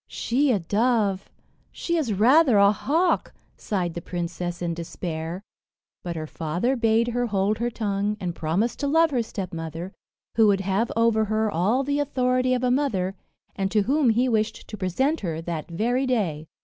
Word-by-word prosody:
"She 270 +4 0
a 225 - +3
dove! 205 +1 0 0.4
she 340 - -2
is 300 -9 0
rather 245 - +5
a 200 0 +6
hawk," 325 - 0 0.2
sighed 180 -5 -2
the 170 - -5
princess 175 0 -4
in 170 -1 -2
despair; 165 +1 -5 0.6
but 175 -1 -5
her 155 -1 -4
father 170 - -1
bade 230 0 +2
her 245 0 -1
hold 205 0 0
her 240 +1 0
tongue, 210 -2 -2
and 180 -3 -3
promise 170 +10 -1
to 285 - -2
love 325 +2 +3
her 250 -3 +1
stepmother, 175 -4 -6 0.4
who 225 -2 +6
would 195 -1 +3
have 195 +4 0
over 230 -1 +3
her 215 0 0
all 210 +11 +1
the 285 +1 -1
authority 255 -2 +1
of 250 - -2
a 250 - +2
mother, 215 -9 0 0.4
and 195 -1 -1
to 210 0 +2
whom 275 +3 +2
he 240 +3 +2
wished 220 -3 -1
to - - -6
present 235 - 0
her 165 -5 -3
that 165 -2 -5
very 240 +9 0
day. 170 -11 -1
215 Hz, 175 wpm, -24 LUFS, 180-250 Hz, 0.6 s, a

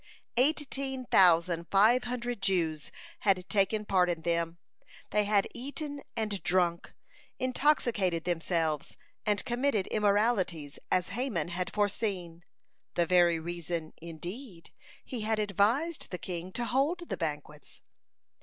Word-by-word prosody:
Eighteen 270 -1 0
thousand 170 -4 +5
five 220 +6 +5
hundred 245 -2 -3
Jews 165 -6 0 0.3
had 190 -3 +1
taken 210 +1 +1
part 180 -3 +3
in 165 -2 -2
them; 170 0 0 0.5
they 210 0 +2
had 200 -1 +3
eaten 285 +3 -5 0.2
and 215 -3 -2
drunk, 175 -1 0 0.4
intoxicated 240 - +1
themselves 165 -3 -1 0.3
and 205 -1 +1
committed 240 -5 +1
immoralities, 200 -8 +1
as 180 -1 +1
Haman 200 - -2
had 180 +1 -3
foreseen, 195 -5 -2 0.5
the 170 - +3
very 175 -1 +4
reason, 170 -1 -4
indeed, 170 - -8 0.3
he 250 -4 -5
had 220 +1 0
advised 215 - +1
the 180 - -4
king 180 0 -6
to 240 - -2
hold 305 +8 0
the - - -1
banquets. 150 -2 -6
195 Hz, 120 wpm, -30 LUFS, 170-240 Hz, 0.5 s, thousand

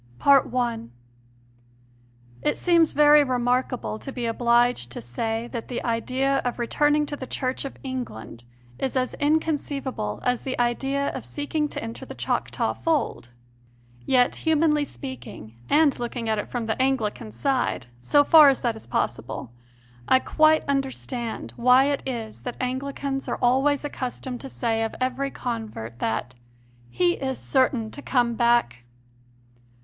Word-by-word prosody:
i. 250 -4 +4 1.6
It 150 - 0
seems 335 -2 +3
very 295 0 +7
remarkable 250 -3 -1
to 270 - -7
be 245 -2 -4
obliged 235 - +2
to - - -6
say 225 - -3
that 235 -2 -4
the 245 - -4
idea 260 +4 0
of 245 -2 -3
returning 295 +5 +2
to 290 - -5
the 260 -2 -7
Church 260 +1 -3
of 275 - -7
England 245 - -6 0.4
is 265 0 -1
as 255 0 0
inconceivable 290 - -1
as 250 -1 +1
the 260 - -4
idea 270 +4 0
of - - -6
seeking 300 +1 -2
to - - -6
enter 230 0 -7
the - - -9
Choctaw - - -1
fold. 310 - -1 0.7
Yet, 245 - +3
humanly 310 -2 +2
speaking, 120 - -9 0.2
and 300 -3 +4
looking 240 -1 -4
at 220 -1 +1
it - - -5
from 240 -2 -3
the 220 +3 -1
Anglican 235 -4 -1
side, 265 - -1
so 290 - +4
far 305 -1 +8
as 270 - 0
that 235 -2 0
is 220 - -10
possible, - - -3 0.6
I - - +6
quite 310 +4 +3
understand 265 -4 -3
why 250 +2 +6
it 285 - -1
is 230 -4 -5
that 245 - -6
Anglicans 270 +1 -3
are - - -2
always 270 +4 +2
accustomed 255 -2 -4
to 270 - -3
say 225 -3 -1
of 225 - -3
every 260 +2 -1
convert 220 - -5
that 120 +2 -2 0.6
"he 175 +9 +2
is 265 -1 -3
certain 255 -4 +1
to 285 - -8
come 240 -4 +1
back." 235 - +2
255 Hz, 145 wpm, -25 LUFS, 230-275 Hz, 1.6 s, far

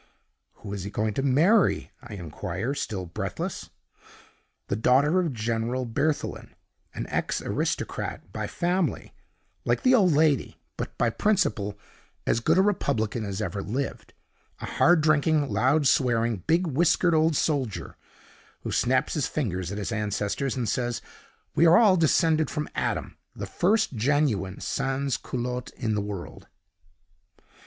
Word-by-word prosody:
"'Who 100 -2 -9
is 100 -3 -4
he 100 - -5
going 110 +1 -1
to 135 - -1
marry?' 155 - +3
I 120 -5 -9
inquire, 95 - -4
still 100 -9 -3
breathless. 85 - -5 1.0
"'The 100 - -1
daughter 140 +9 +4
of 170 -4 0
General 115 +2 -2
Berthelin 145 +6 -2 0.4
an - - -3
ex - - -1
aristocrat - - -3
by - - -3
family, 180 +1 -1 0.5
like - - 0
the 255 -1 +5
old 195 -8 +5
lady; 150 -2 +2 0.2
but - - -6
by 120 -1 +2
principle 110 - 0 0.5
as - - +2
good 155 +9 +2
a 190 - +5
republican 120 - 0
as 100 +1 -3
ever 100 +1 -3
lived 130 +8 -4 0.5
a - - -5
hard 175 -1 +4
drinking, 155 -1 +2
loud 130 +8 +2
swearing, 120 -4 +2
big 170 +3 +3
whiskered 170 +3 +2
old 160 0 +3
soldier, 135 - -1 0.7
who - - -5
snaps 130 +3 +1
his 150 - 0
fingers 95 - -2
at 100 - -4
his 105 +2 -3
ancestors 105 +4 -1
and 125 -3 -2
says 120 +2 -1 0.5
we 170 - +5
are 170 +2 +7
all 210 -5 +6
descended 160 -2 +3
from 150 0 -3
Adam, - - -2 0.2
the - - -5
first 215 -1 +1
genuine 115 -6 0
sans 135 0 -1
culotte 125 0 -4
in 110 -2 -1
the 105 - 0
world. 100 -3 -7
130 Hz, 145 wpm, -26 LUFS, 110-155 Hz, 1.0 s, are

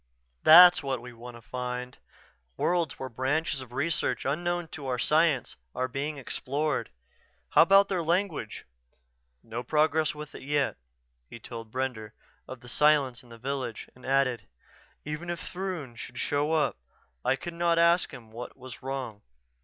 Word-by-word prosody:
"That's 175 +2 +9
what 135 -3 -2
we 125 +1 -10
want 120 +1 -10
to 115 - -16
find 125 0 -5 0.6
worlds 170 -3 0
where 130 - -5
branches 135 +4 -1
of 125 -2 -11
research 150 +6 -1
unknown 175 +4 -1
to 145 -3 -7
our 125 -1 0
science 150 0 +2 0.2
are 130 - 0
being 145 +3 -3
explored. 140 +3 -2 0.6
How - - +6
about 195 +4 +6
their 185 -3 -1
language?" 170 - -1 0.8
"No 115 +2 -5
progress 155 +3 +2
with 150 0 -8
it - - -9
yet." 145 0 0 0.5
He - - -9
told 115 -1 -9
Brender 125 -5 -3 0.3
of 130 -2 -9
the 125 - -13
silence 140 -2 +3
in 125 - -20
the 115 - -11
village 130 -1 -4
and 125 - -19
added, 135 -2 +1 0.6
"Even 150 +4 -5
if 175 -1 -3
Throon 180 -9 -5
should 120 +1 -9
show 145 +4 0
up 155 - +1 0.5
I 130 - +3
could 170 +6 -7
not 170 0 +2
ask 170 +1 +4
him 120 -6 -12
what 120 +4 -8
was 130 -3 -10
wrong. 130 -6 -5
135 Hz, 160 wpm, -28 LUFS, 125-160 Hz, 0.8 s, That's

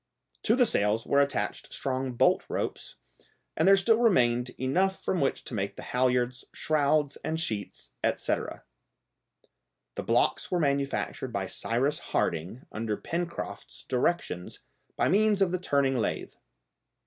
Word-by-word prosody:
To 225 - +4
the 250 -1 +5
sails 105 - +1
were 140 - +4
attached 140 0 -1
strong 130 -1 -2
bolt 120 - +3
ropes, - - -3 0.6
and - - +2
there 195 0 +8
still 220 +4 +3
remained 125 - +3
enough 185 +9 +1
from 185 - 0
which 135 - 0
to - - -8
make 100 -2 -2
the - - -8
halliards, 125 0 +1
shrouds, 150 -1 +1
and 160 +1 -1
sheets, 110 -10 -4
etc. - - -1 1.3
The - - -4
blocks - - +1
were 180 - +1
manufactured 140 -2 -1
by - - -2
Cyrus 135 +6 -1
Harding 85 - -2
under 110 -1 -2
Pencroft's 170 0 -5
directions 125 - -1 0.4
by - - +2
means 210 +1 +3
of 190 -3 +3
the 185 - -1
turning 140 -5 +1
lathe. 115 - -2
140 Hz, 135 wpm, -28 LUFS, 120-175 Hz, 1.3 s, there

